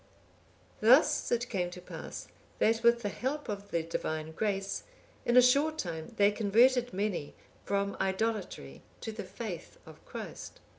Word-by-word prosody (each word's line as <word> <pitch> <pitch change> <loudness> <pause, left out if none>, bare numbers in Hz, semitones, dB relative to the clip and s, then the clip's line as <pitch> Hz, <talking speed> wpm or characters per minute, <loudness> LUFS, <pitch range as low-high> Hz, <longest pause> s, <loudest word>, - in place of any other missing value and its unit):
Thus 270 +7 +5
it 240 0 +1
came 180 -6 -1
to 180 - -9
pass, 180 - -8 0.3
that 225 +1 +3
with 235 0 +4
the 205 - 0
help 275 +8 -3
of 200 -2 -5
the 165 -1 0
Divine 160 -1 -3
grace, 195 +2 -1 0.5
in 240 - +4
a 250 - +9
short 285 +5 +4
time 165 - -4
they 205 0 +5
converted 240 +4 +4
many 190 -7 -2 0.3
from 200 0 0
idolatry 190 - -2 0.2
to 225 - -4
the 215 -1 -6
faith 185 -4 -7
of - - -14
Christ. - - -8
210 Hz, 150 wpm, -31 LUFS, 185-240 Hz, 0.5 s, a